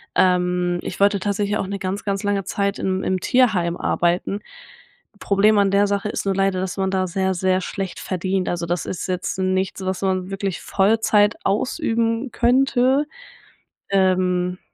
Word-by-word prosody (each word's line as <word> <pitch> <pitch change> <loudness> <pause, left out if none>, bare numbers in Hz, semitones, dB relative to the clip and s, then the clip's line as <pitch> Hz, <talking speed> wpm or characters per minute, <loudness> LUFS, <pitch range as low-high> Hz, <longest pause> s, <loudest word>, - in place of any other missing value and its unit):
Ähm, 180 -1 +2
ich - - -6
wollte 200 0 +4
tatsächlich 205 +1 -1
auch - - -3
'ne 200 +1 -4
ganz, 195 +2 -4
ganz 200 0 -2
lange 200 -2 0
Zeit 200 +1 -1
im 190 0 -1
im 185 0 0
Tierheim 195 -9 +2
arbeiten. 175 +3 0 0.8
Problem 205 +2 +3
an 200 -1 +3
der 200 +1 +4
Sache 200 +1 -1
ist - - -4
nur 195 - +1
leider, 195 -1 +1
dass 190 +1 -4
man 190 0 0
da 190 -1 +1
sehr 190 +1 0
sehr 185 +1 +1
schlecht 190 0 -5
verdient. 185 0 -2
Also, 175 -1 -2
das 175 0 -2
ist 185 - -4
jetzt 180 -1 -3
nichts, 190 0 -1
was 185 0 -2
man 185 -1 -1
wirklich 195 -2 -3
Vollzeit 210 +1 +2
ausüben 230 +2 0
könnte, 260 +3 +2 0.8
ähm. 185 -1 +1
195 Hz, 165 wpm, -21 LUFS, 185-205 Hz, 0.8 s, wollte